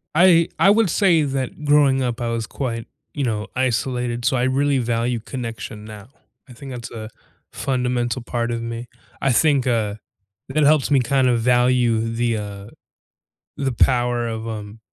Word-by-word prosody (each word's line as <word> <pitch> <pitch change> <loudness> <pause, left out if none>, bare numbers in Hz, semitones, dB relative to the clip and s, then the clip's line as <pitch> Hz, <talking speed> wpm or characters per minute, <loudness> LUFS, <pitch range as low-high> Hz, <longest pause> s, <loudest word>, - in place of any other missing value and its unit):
I 170 -1 +6
I 195 - +6
would 215 -1 +4
say 170 -3 +3
that 135 +1 -3
growing 145 -2 +4
up, 120 0 -2
I 120 - -1
was 115 -1 -2
quite, 115 -4 -4 0.3
you 145 - -2
know, 110 -4 -2
isolated, 125 -1 -1
so 130 0 +2
I 120 - +1
really 140 +2 +2
value 120 0 0
connection 115 -3 -7
now. 110 +1 -11 0.4
I 125 - -13
think 135 +3 -10
that's 120 -2 -7
a 110 -1 -7 0.4
fundamental 125 -1 -1
part 120 0 -2
of 115 0 -2
me. 115 +1 -5 0.3
I 135 - +2
think, 140 0 +3
uh, 110 -4 0 0.5
that 150 +3 +1
helps 150 -1 +3
me 140 - +5
kind 130 +1 +2
of 120 -1 +2
value 125 -1 +3
the, 115 -1 0
uh, 100 -1 -7 0.9
the 135 -1 -1
power 120 0 +2
of, 110 0 -5
um, 105 -1 -7
125 Hz, 170 wpm, -21 LUFS, 115-135 Hz, 0.9 s, I